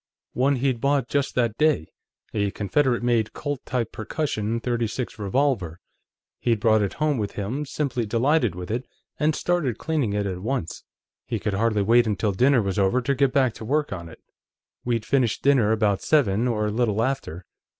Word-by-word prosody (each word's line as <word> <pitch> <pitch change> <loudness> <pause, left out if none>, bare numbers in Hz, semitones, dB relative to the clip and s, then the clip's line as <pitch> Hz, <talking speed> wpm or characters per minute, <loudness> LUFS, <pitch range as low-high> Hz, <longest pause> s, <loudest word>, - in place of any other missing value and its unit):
"One 135 +3 +2
he'd 130 -2 0
bought 140 -3 +1
just 140 -1 -1
that 115 -3 0
day; 150 - +2 0.4
a 100 -2 0
Confederate 120 +6 0
made 120 -3 +1
Colt 145 -3 -4
type 125 -3 -1
percussion 115 -2 -2
.36 120 0 -3
revolver. 100 - 0 0.6
He'd 115 -2 +1
brought 110 0 +3
it 100 - -1
home 150 -4 0
with 105 -2 -3
him, 125 +9 -3
simply 130 -6 -2
delighted 120 - +2
with 90 +2 -6
it, 120 +3 -3 0.3
and 155 0 +2
started 165 -10 0
cleaning 150 -10 -1
it 105 0 -1
at 95 -2 -3
once. 115 -5 -3 0.4
He - - -1
could 105 -2 -2
hardly 105 0 +1
wait 115 +3 +4
until 105 0 0
dinner 125 +4 +3
was 100 +1 -1
over 100 +6 +3
to 130 +3 0
get 140 -1 +2
back 130 -4 +2
to - - -10
work 145 +2 0
on 85 -3 -7
it. - - -13 0.7
"We'd 115 -3 -1
finished 130 -5 +1
dinner 130 -6 +4
about 105 -3 +1
seven, 120 -6 +2
or 110 -3 0
a 105 - -1
little 110 -1 +1
after. 115 -10 -3
115 Hz, 180 wpm, -24 LUFS, 105-135 Hz, 0.7 s, wait